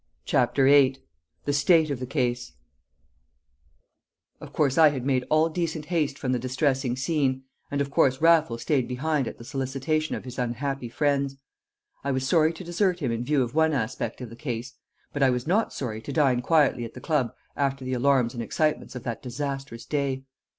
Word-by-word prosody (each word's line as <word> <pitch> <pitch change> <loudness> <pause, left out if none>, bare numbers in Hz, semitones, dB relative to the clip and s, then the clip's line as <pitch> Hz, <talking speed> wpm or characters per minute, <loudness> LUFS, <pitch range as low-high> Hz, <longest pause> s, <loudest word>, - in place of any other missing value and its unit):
CHAPTER 125 +2 +2
VIII 135 -1 +5 0.5
The 145 - 0
State 155 +2 +4
of 135 - -2
the 125 - -5
Case 125 -3 -1 1.9
Of - - -10
course 140 -4 +1
I 155 -3 +5
made 130 0 0
all 155 +1 +4
decent 160 -2 -3
haste 155 -5 -1
from 130 - -2
the 125 - +1
distressing 130 0 0
scene, 135 -2 0 0.3
and 140 0 -1
of 140 0 -2
course 130 -1 +3
Raffles 160 -8 +3
stayed 135 -5 +1
behind 135 +1 -1
at - - -6
the - - -11
solicitation 135 +4 -2
of - - -7
his 125 -1 -7
unhappy 125 +1 -2
friends. 140 +1 0 0.7
I 140 - -2
was 130 0 -1
sorry 160 -1 +4
to 170 +3 -9
desert 175 +1 +1
him 135 -7 -1
in 115 +1 -2
view 140 +1 +2
of 120 0 -5
one 160 0 +3
aspect 120 -2 -3
of 120 -3 -7
the - - -9
case; 120 -1 -5 0.4
but 145 - -3
I 135 - +5
was 125 -1 -1
not 205 +7 +1
sorry 110 -5 -4
to 140 - -7
dine 135 -4 +2
quietly 145 -3 +3
at 115 - -8
the - - -7
club 145 -8 0 0.2
after 135 -2 -1
the 130 - -2
alarms 125 -2 +2
and 120 - -4
excitements 150 +4 -1
of 125 - -6
that 115 -2 -4
disastrous 135 -1 -5
day. 140 -3 -1
135 Hz, 190 wpm, -26 LUFS, 125-150 Hz, 1.9 s, VIII